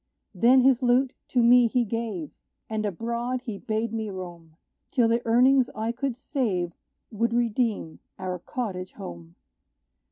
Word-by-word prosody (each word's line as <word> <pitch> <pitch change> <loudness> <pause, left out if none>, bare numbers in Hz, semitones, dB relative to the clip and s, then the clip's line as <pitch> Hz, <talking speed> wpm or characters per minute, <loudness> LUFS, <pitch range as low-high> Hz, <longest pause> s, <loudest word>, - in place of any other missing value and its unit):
Then 240 +7 +5
his 260 -1 +4
lute 250 +1 +3
to 245 -2 +2
me 245 0 +7
he 240 +1 +1
gave; 215 -7 -4 0.4
And 215 -1 -2
abroad 235 +6 -3
he 220 -5 -6
bade 220 +1 -2
me 220 -1 -2
roam, 175 -4 -9 0.3
Till 245 -5 +3
the 230 +1 +2
earnings 250 +2 +5
I 220 +1 -1
could 255 +1 -3
save 210 - -2 0.4
Would 230 +2 0
redeem 230 -7 0 0.2
our 185 -1 -4
cottage 185 -4 -5
home. 85 -1 -9
230 Hz, 140 wpm, -26 LUFS, 190-245 Hz, 0.4 s, me